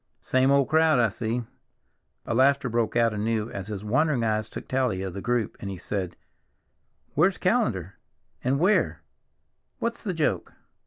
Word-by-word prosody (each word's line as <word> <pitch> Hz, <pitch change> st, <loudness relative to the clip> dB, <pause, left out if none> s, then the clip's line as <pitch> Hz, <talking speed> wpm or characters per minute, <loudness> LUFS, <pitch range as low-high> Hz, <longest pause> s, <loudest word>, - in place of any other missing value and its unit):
"Same 130 Hz, +1 st, +2 dB
old 140 Hz, -1 st, +4 dB
crowd, 160 Hz, -2 st, +4 dB
I 115 Hz, -2 st, +4 dB
see." 115 Hz, +3 st, -2 dB, 0.8 s
The -, -, -2 dB
laughter 135 Hz, +1 st, +3 dB
broke 115 Hz, -1 st, 0 dB
out 115 Hz, -2 st, +3 dB
anew 110 Hz, +1 st, -1 dB
as 95 Hz, -1 st, -6 dB
his 105 Hz, -2 st, -5 dB
wandering 135 Hz, +2 st, +2 dB
eyes 110 Hz, -1 st, 0 dB
took -, -, -8 dB
tally 125 Hz, -8 st, 0 dB
of 95 Hz, -2 st, -4 dB
the 100 Hz, -, -5 dB
group, 120 Hz, -2 st, -1 dB
and 100 Hz, -, -5 dB
he 95 Hz, -, -5 dB
said, 90 Hz, 0 st, -4 dB, 1.0 s
"Where's 190 Hz, 0 st, +3 dB
Callender? 110 Hz, -, 0 dB, 0.4 s
and 135 Hz, +2 st, +1 dB
Weir? 190 Hz, +6 st, +2 dB, 0.7 s
What's 235 Hz, 0 st, -3 dB
the 190 Hz, -5 st, -3 dB
joke?" 155 Hz, -2 st, -1 dB
120 Hz, 160 wpm, -26 LUFS, 105-140 Hz, 1.0 s, old